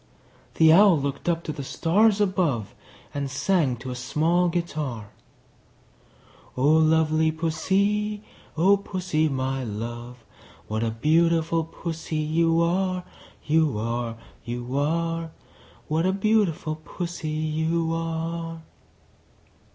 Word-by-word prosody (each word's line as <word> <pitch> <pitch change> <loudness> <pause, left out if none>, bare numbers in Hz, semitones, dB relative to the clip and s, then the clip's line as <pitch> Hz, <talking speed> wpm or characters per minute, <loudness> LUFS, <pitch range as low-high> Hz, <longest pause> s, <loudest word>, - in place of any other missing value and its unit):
The 160 -1 +6
Owl 190 -3 +6
looked 140 +4 -3
up 170 -1 0
to - - -4
the 145 -2 -6
stars 200 +9 +2
above, 175 - 0 0.4
And 140 -1 -3
sang 145 -1 +1
to 125 +2 -7
a - - -4
small 165 +8 +1
guitar, 145 - -3 1.5
"O 140 +4 +4
lovely 160 0 +3
Pussy, 200 +6 0 0.3
O 195 +5 +5
Pussy, 185 -5 -1
my 135 -1 -2
love, 120 +2 -6 0.4
What 110 +1 -2
a 115 - 0
beautiful 165 +6 +2
Pussy 165 0 -6
you 165 +2 +2
are, 185 +1 0 0.4
You 155 -5 +2
are, 115 +1 -3 0.3
You 120 +2 -5
are! 165 +3 0 0.6
What 160 +4 +1
a 190 - +2
beautiful 195 -7 +1
Pussy 170 -2 -5
you 160 +2 -1
are!" 165 0 -4
160 Hz, 110 wpm, -25 LUFS, 140-170 Hz, 1.5 s, The